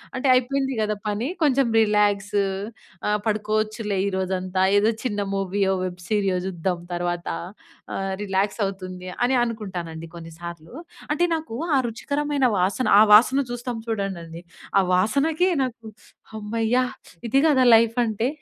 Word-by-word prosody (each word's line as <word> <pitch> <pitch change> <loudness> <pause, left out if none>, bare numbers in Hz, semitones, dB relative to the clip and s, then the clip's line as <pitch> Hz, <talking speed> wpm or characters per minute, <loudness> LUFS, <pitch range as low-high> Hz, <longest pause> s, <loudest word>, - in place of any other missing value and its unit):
అంటే 260 +2 -1
అయిపోయింది 265 +2 +1
కద 215 0 0
పని 210 +4 -1 0.2
కొంచెం 275 -3 +3
రిలాక్స్. 205 -1 +1 0.7
ఆ! - - +1 0.2
పడుకోవచ్చులే 215 0 -1
ఈ - - +1
రోజంతా 185 0 -1 0.2
ఏదో 215 +2 +3
చిన్న 205 -5 -2 0.2
మూవీయో, 195 0 0
వెబ్ 180 0 -6
సీరియో 195 -4 +1
చూద్దాం 180 -1 -2 0.2
తర్వాత 175 0 -3 0.7
ఆహ్, 195 0 -2
రిలాక్స్ 195 +2 -1
అవుతుంది 185 -1 -7 0.2
అని 255 +1 +2
అనుకుంటానండి 175 -8 -5
కొన్నిసార్లు. 165 +1 -9 0.4
అంటే 325 +4 +1
నాకు 310 -8 -6 0.2
ఆ - - +4
రుచికరమైన 285 +3 -1
వాసన 200 +8 0
ఆ - - +8
వాసన 250 +6 +6
చూస్తాం 245 0 -4
చూడండండి. 195 -5 -2 0.6
ఆ - - +5
వాసనకి 285 - +2 0.2
నాకు 235 -3 -6 0.5
హమ్మయ్య! 220 +2 -1 0.5
ఇది 270 +4 +3
కదా 270 -4 +4
లైఫ్ 230 +1 +3
అంటే. 220 +1 -1
210 Hz, 130 wpm, -23 LUFS, 190-245 Hz, 0.7 s, ఆ